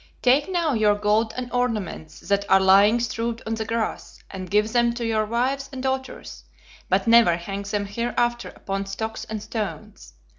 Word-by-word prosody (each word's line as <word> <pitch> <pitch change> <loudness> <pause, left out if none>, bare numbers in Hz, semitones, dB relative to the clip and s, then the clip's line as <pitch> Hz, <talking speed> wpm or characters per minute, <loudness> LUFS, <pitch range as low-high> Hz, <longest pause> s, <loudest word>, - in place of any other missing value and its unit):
Take 270 +6 +3
now 340 -5 +1
your 215 -3 +3
gold 210 +2 +1
and 250 -1 -5
ornaments 215 -10 -3
that 200 0 0
are 195 - +6
lying 200 +4 +5
strewed 230 0 -3
on 225 - -2
the 220 0 -3
grass, 230 0 -3
and 185 -2 -7
give 210 +2 +1
them 235 -1 +2
to 235 -1 -3
your 215 -1 0
wives 265 +4 -1
and 260 -1 -6
daughters, 265 0 -4 0.5
but - - +2
never 230 -7 +5
hang 195 +3 -5
them 205 0 -3
hereafter 240 +3 -1
upon 195 0 -5
stocks 220 +3 -5
and 215 -1 -6
stones. 215 -1 -6
220 Hz, 175 wpm, -23 LUFS, 205-240 Hz, 0.5 s, are